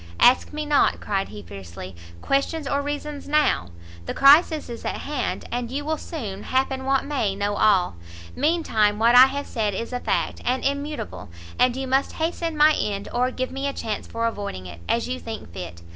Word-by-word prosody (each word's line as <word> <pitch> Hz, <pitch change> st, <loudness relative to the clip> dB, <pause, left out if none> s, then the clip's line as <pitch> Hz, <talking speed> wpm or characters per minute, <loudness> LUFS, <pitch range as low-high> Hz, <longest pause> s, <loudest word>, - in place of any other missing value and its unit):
"Ask 250 Hz, +1 st, +5 dB
me 305 Hz, 0 st, -4 dB
not," 295 Hz, -1 st, +3 dB
cried 195 Hz, -2 st, -2 dB
he, 105 Hz, -1 st, -9 dB
fiercely, 90 Hz, 0 st, -9 dB, 0.3 s
"questions 280 Hz, +2 st, 0 dB
or 280 Hz, +1 st, 0 dB
reasons 290 Hz, 0 st, -5 dB
now; 300 Hz, -, +2 dB, 0.4 s
the -, -, -3 dB
crisis 305 Hz, +3 st, +6 dB
is 235 Hz, -1 st, -7 dB
at -, -, -3 dB
hand, 285 Hz, -3 st, -3 dB
and 240 Hz, -1 st, -2 dB
you 285 Hz, +3 st, -4 dB
will 315 Hz, 0 st, -1 dB
soon, 210 Hz, -, -6 dB
happen 265 Hz, +1 st, -1 dB
what 270 Hz, 0 st, +2 dB
may, 250 Hz, -9 st, -1 dB
know 205 Hz, +1 st, -1 dB
all; 190 Hz, -, +3 dB, 0.4 s
mean 320 Hz, +5 st, +1 dB
time 210 Hz, -6 st, +2 dB
what 230 Hz, +2 st, +4 dB
I 255 Hz, +1 st, +10 dB
have 280 Hz, +1 st, -4 dB
said 210 Hz, -4 st, -1 dB
is 230 Hz, +5 st, -4 dB
a 250 Hz, -, -1 dB
fact, -, -, -1 dB
and 255 Hz, +1 st, 0 dB
immutable; 285 Hz, -, -3 dB, 0.3 s
and 250 Hz, -1 st, +4 dB
you 265 Hz, 0 st, -3 dB
must 265 Hz, +1 st, +1 dB
hasten 330 Hz, 0 st, -2 dB
my 305 Hz, +1 st, +6 dB
end, 200 Hz, -6 st, -2 dB
or 250 Hz, +1 st, +2 dB
give 255 Hz, 0 st, -3 dB
me 270 Hz, +1 st, -3 dB
a 280 Hz, -, -2 dB
chance 220 Hz, -5 st, -4 dB
for 230 Hz, 0 st, -2 dB
avoiding 200 Hz, -, -4 dB
it, 85 Hz, -1 st, -10 dB
as 235 Hz, +1 st, +1 dB
you 255 Hz, +1 st, -3 dB
think 220 Hz, -, -8 dB
fit. 85 Hz, -1 st, -8 dB
255 Hz, 200 wpm, -24 LUFS, 205-285 Hz, 0.4 s, I